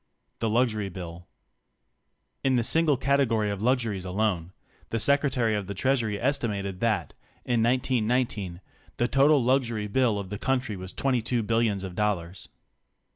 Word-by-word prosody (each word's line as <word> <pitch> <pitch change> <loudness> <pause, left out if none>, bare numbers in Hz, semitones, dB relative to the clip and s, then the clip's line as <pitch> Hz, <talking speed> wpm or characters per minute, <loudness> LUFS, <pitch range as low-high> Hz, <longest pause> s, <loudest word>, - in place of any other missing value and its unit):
THE 115 - 0
LUXURY 110 -3 +1
BILL 85 -1 -8 1.2
In 135 -1 +3
the 120 - +2
single 155 +2 +3
category 125 -6 +1
of 100 -1 -4
luxuries 115 -5 0
alone, 95 -2 -1 0.4
the 115 - -1
Secretary 130 -2 +2
of 100 -3 -2
the 100 - -5
Treasury 115 -3 0
estimated 105 -8 -1
that, 115 -1 0 0.3
in 120 -2 +1
1919, 115 -6 0 0.4
the 120 - +2
total 140 +1 +4
luxury 120 -4 +1
bill 115 0 +1
of 100 -1 -6
the 105 - -4
country 130 -5 -1
was 95 0 -6
22 125 -3 0
billions 110 -3 +1
of 95 -2 -6
dollars. 95 -3 -2
115 Hz, 140 wpm, -27 LUFS, 100-130 Hz, 1.2 s, total